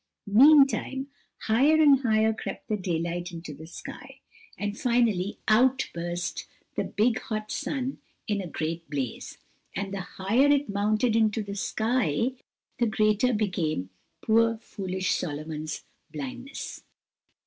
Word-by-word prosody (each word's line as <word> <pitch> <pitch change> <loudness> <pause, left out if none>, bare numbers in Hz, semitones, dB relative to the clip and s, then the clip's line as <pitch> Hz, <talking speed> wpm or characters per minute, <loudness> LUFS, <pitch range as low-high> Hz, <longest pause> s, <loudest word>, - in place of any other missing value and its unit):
Meantime, 270 +3 +5 0.3
higher 270 +8 +4
and 295 -4 +6
higher 220 -3 +2
crept 220 - -7
the 215 - 0
daylight 175 -2 -2
into 165 -3 -7
the 160 +3 -11
sky, 175 - -10 0.4
and 205 0 -3
finally 230 -6 +1
out 250 +5 +3
burst 175 +1 -4 0.3
the - - -1
big, 225 +2 +1
hot 215 -1 -4
sun 270 -2 -3 0.3
in 205 -2 0
a 185 - -5
great 165 0 -4
blaze, 135 -5 -4 0.4
and 195 0 -3
the 195 - -3 0.2
higher 225 +9 +3
it 285 0 +3
mounted 215 +3 +1
into 220 -1 +2
the 200 0 -6
sky 220 - 0 0.5
the 240 - +3
greater 215 +3 +2
became 175 - -1 0.3
poor, 230 +1 +3
foolish 190 -4 -3
Solomon's 155 -1 -4 0.3
blindness. 155 - -6
210 Hz, 125 wpm, -27 LUFS, 175-240 Hz, 0.5 s, and